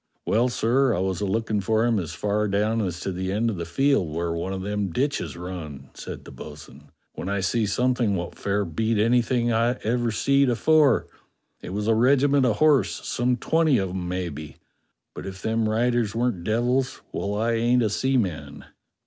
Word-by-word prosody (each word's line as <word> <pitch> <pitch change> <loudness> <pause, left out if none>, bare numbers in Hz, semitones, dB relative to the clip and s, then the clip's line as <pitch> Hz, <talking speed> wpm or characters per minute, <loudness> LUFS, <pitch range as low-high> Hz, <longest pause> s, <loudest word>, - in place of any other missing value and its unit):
"Well, 120 +4 +2
sir, 120 +1 +2
I - - -1
was 95 -1 -1
a 100 - 0
lookin' 110 +1 -1
for 110 +3 +1
him 115 -3 +2
as 85 -2 -5
far 105 +2 0
down 105 +3 +1
as 90 -4 -3
to 95 - -3
the 95 +1 -3
end 115 +3 0
of 100 - -5
the 85 - -4
field 135 - +1
where 85 +2 -2
one 85 +3 -3
of 95 -1 -4
them 105 -1 -2
ditches 140 - -2
run," 85 -6 -8
said - - -8
the - - -10
bo'sun, 75 -1 -12 0.2
"when 90 - -5
I 100 -1 -1
see 105 +3 0
something 125 -1 +1
wot 85 -1 -4
fair 100 0 -1
beat 110 +7 -1
anything 120 +2 +2
I 115 +2 +2
ever 120 +2 0
seed 140 +5 +2
afore: 145 +2 +3 0.6
it - - -8
was 105 +2 -2
a 115 - +4
regiment 135 +3 +3
of 110 - +1
horse, 135 - +2
some 125 +1 0
twenty 160 +1 +2
of 95 -2 -1
'em 90 -1 -4
maybe, 85 -5 -5 0.6
but - - -7
if 95 0 -7
them 110 0 0
riders 115 -1 +1
weren't 115 -7 -1
devils, 125 +5 0
well, 100 +1 -3
I 115 +3 0
ain't 120 +2 +2
a 110 - +1
seaman." 90 - -1
110 Hz, 190 wpm, -24 LUFS, 95-120 Hz, 0.6 s, a